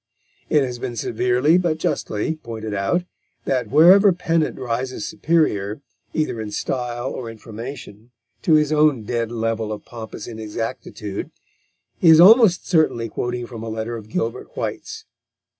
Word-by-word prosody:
It 150 -2 +4
has 125 -2 -4
been 120 -1 -4
severely, 125 +9 +2
but 170 -3 0
justly, 155 0 -2
pointed 110 -6 -6
out 105 - 0 0.4
that 130 -2 -1
wherever 185 +7 +7
Pennant 165 -3 0
rises 125 +1 -3
superior, 145 -10 0 0.3
either 155 -7 -2
in 110 - -5
style 120 +3 -3
or 120 -3 -6
information, 115 0 -9 0.3
to 165 - +2
his 150 -1 +3
own 150 -6 +3
dead 115 +1 -2
level 115 -1 -2
of 105 - -6
pompous 110 -3 -8
inexactitude, 110 -2 -5 0.7
he 170 - +5
is 160 0 +8
almost 205 0 +7
certainly 155 -9 +2
quoting 120 +2 -3
from 115 -2 -9
a 115 - -5
letter 110 +1 -4
of 110 -2 -9
Gilbert 115 +1 -4
White's. - - -5
120 Hz, 140 wpm, -21 LUFS, 110-155 Hz, 0.7 s, is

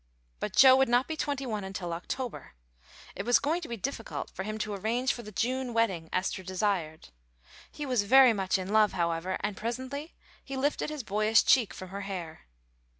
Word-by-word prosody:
But 210 - -4
Joe 260 -1 +8
would 265 -2 +3
not 245 +2 +3
be 320 - -3
twenty 285 -3 -2
one 215 -4 -3
until 190 -3 -5
October. 205 - -6 0.6
It - - -3
was 245 +1 +4
going 320 +5 -1
to 325 - -6
be 235 - -5
difficult 240 +1 -5
for - - -6
him 215 +2 -4
to 215 -1 -3
arrange 230 +6 0
for 240 - -7
the 210 -2 -10
June 250 +3 -2
wedding 190 -8 0
Esther 185 +1 -1
desired. 185 - -2 0.6
He 300 - -6
was 250 -5 +1
very 255 +4 +7
much 195 -2 0
in 190 +2 -4
love, 215 -2 +4
however, 170 +1 -1
and 205 -1 -2
presently 260 - -5 0.3
he 270 -1 -6
lifted 290 +3 0
his 305 -4 -5
boyish 215 +1 +3
cheek 240 -6 +4
from 185 - -9
her 200 +2 -6
hair. 175 - -7
215 Hz, 195 wpm, -29 LUFS, 190-260 Hz, 0.6 s, Joe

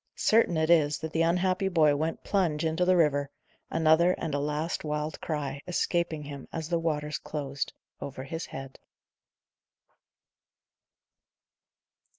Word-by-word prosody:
Certain 215 -7 +3
it 160 +1 +2
is, 150 -3 +4
that 160 0 -5
the 165 - +1
unhappy 185 +3 +2
boy 155 -5 +4
went 160 +3 -2
plunge 165 -6 +1
into 160 +3 +1
the 185 0 +4
river, 145 -4 +2 0.4
another 165 +2 +4
and 160 - -4
a 145 - +1
last 150 +3 -2
wild 150 0 -3
cry 140 -3 -3
escaping 170 -3 0
him 140 -1 -8
as 160 -1 -4
the 170 -1 +1
waters 150 -2 -2
closed 140 -2 -4 0.3
over 130 -1 -6
his 165 +5 -5
head. 135 0 -8
160 Hz, 135 wpm, -28 LUFS, 150-170 Hz, 0.4 s, is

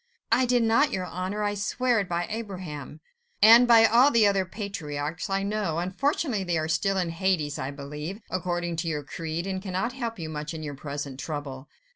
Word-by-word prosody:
"I 250 +2 +4
did 245 -1 +3
not, 230 +6 +3
your 185 -1 -2
Honour; 185 +4 -3
I 205 0 0
swear 230 +4 +1
it 195 - -3
by 175 0 -1
Abraham.. 180 - -6 0.2
." 475 0 -45
"And 230 +3 +9
by 230 -1 +7
all 240 +5 +6
the 230 -6 +4
other 195 -2 +2
patriarchs, 165 -5 -5
I 195 0 0
know. 200 -5 -1
Unfortunately, 215 - 0
they 175 -2 0
are 155 0 -1
still 195 +5 +1
in 175 -3 0
Hades, 165 -4 0
I 130 - -3
believe, 150 +7 -6
according 175 -2 -2
to 165 +1 -2
your 150 -2 -2
creed, 160 +3 -4
and 190 -1 -3
cannot 190 +5 -2
help 235 -3 -4
you 165 -3 -5
much 150 +1 -5
in 155 - -6
your 145 -1 -5
present 140 -1 -6
trouble. 140 -2 -6
185 Hz, 200 wpm, -26 LUFS, 155-215 Hz, 0.2 s, And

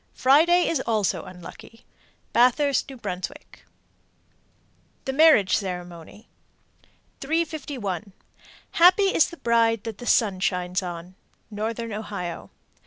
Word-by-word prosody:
Friday 330 +7 +4
is 325 - 0
also 215 -4 0
unlucky. 185 +6 -13 0.5
Bathurst, 275 +3 +2
N.B. 260 -3 -13 2.0
THE 265 - -2
MARRIAGE 290 -10 +5
CEREMONY. 180 +1 -7 0.9
351. 275 - -3 0.6
Happy 370 +3 +5
is - - +3
the 340 - -11
bride 230 -3 +1
that 220 -3 -7
the 245 - -8
sun 200 -5 +2
shines 180 0 -1
on. 175 0 -7 0.4
_Northern 225 +2 -4
Ohio. 200 -5 -6
225 Hz, 100 wpm, -24 LUFS, 190-280 Hz, 2.0 s, MARRIAGE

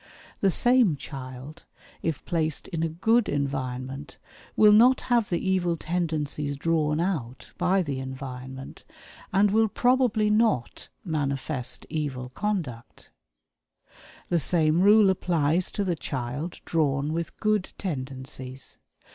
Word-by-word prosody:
The 195 - +3
same 240 - +4
child, 130 +2 -9 0.4
if 160 -4 -3
placed 160 -3 -1
in 165 - -3
a 165 - 0
good 220 +8 +2
environment, 135 0 -3 0.4
will 210 -1 +7
not 245 +5 +6
have 240 -4 +1
the 175 +1 -1
evil 175 -3 +1
tendencies 155 -4 -2
"drawn 155 0 +1
out" 155 -9 -3
by 185 +2 +2
the 140 -4 -3
environment, 130 0 -7 0.5
and 200 +1 +4
will 220 +1 +4
probably 245 -2 +2
not 215 - +1 0.2
manifest 140 -4 -2
evil 135 -5 -3
conduct. 155 - -4 1.2
The 175 - +2
same 160 +1 +2
rule 205 0 +6
applies 170 -1 +1
to 205 - -1
the 180 -3 0
child 140 +3 -5
drawn 145 -2 0
with 170 0 -4
good 215 -3 0
"tendencies." 130 -5 -6
160 Hz, 120 wpm, -26 LUFS, 135-190 Hz, 1.2 s, will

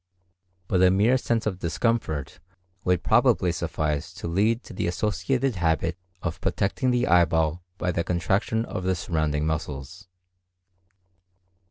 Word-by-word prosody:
But 90 -2 +2
a 95 - +7
mere 105 +7 +4
sense 115 -3 0
of 95 -4 -2
discomfort 85 - -1 0.4
would 90 -2 +1
probably - - +3
suffice 75 -2 -2
to - - -6
lead 105 +8 +1
to - - -11
the 90 - -2
associated 110 +7 0
habit 85 0 +1 0.3
of 85 0 -3
protecting 110 +6 0
the 125 0 +2
eyeball 85 -2 +3 0.2
by 90 - -1
the 85 -1 -1
contraction 100 +6 0
of 90 - -5
the 95 0 +1
surrounding 80 -3 -1
muscles. 80 +3 -4
90 Hz, 135 wpm, -25 LUFS, 80-110 Hz, 0.4 s, a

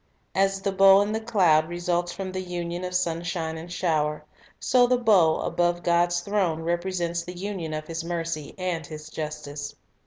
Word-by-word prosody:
As 195 0 +1
the 200 - +1
bow 195 0 +7
in 205 +1 0
the 220 - -1
cloud 175 -9 +3
results 175 0 -1
from 190 +1 -5
the 185 0 -3
union 175 -1 -4
of 180 0 -4
sunshine 170 -2 -1
and 165 +2 -8
shower, 155 -4 0 0.3
so 245 -1 +4
the 250 0 +3
bow 195 -9 +4
above 175 0 0
God's 175 0 +2
throne 180 -5 0
represents 175 0 -1
the 175 +1 -8
union 185 -4 -4
of 155 0 -5
His 165 +1 -4
mercy 165 -3 -4
and 180 -3 -2
His 155 0 -9
justice. 150 -2 -6
175 Hz, 175 wpm, -26 LUFS, 160-190 Hz, 0.3 s, bow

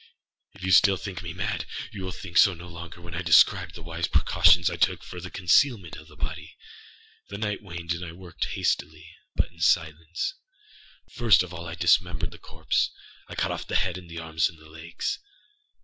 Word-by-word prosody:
If 95 -1 -1
still 95 +2 +6
you - - -9
think 95 -2 -5
me 85 -2 -6
mad, 100 +5 -3 0.2
you 100 - -7
will 95 - -4
think 90 -1 -9
so 95 +1 +6
no 85 +1 -11
longer 85 0 -9
when 85 0 -10
I 85 - -2
describe 85 +1 +5
the 85 - -10
wise 85 0 -3
precautions 90 -1 +4
I - - 0
took - - +1
for 90 - -8
the 90 - -7
concealment 95 - +2
of 75 - -12
the 75 - -16
body. - - -6 0.7
The 100 - -6
night 105 -1 -2
waned, 85 -4 -4
and 85 +1 -5
I 85 - -6
worked 85 -1 -5
hastily, 80 +2 -2 0.2
but - - 0
in 85 - -21
silence. 80 - +1 0.8
First 115 -5 +4
of 90 -1 -9
all 85 0 -7
I 85 - -5
dismembered 85 -1 +2
the - - -13
corpse. - - -1 0.4
I - - -8
cut - - 0
off - - -5
the - - -3
head 95 -2 +1
and 90 -2 -10
the 85 - -8
arms 80 -1 0
and 85 - -15
the 80 0 -17
legs. 80 +1 -4
85 Hz, 205 wpm, -26 LUFS, 85-95 Hz, 0.8 s, still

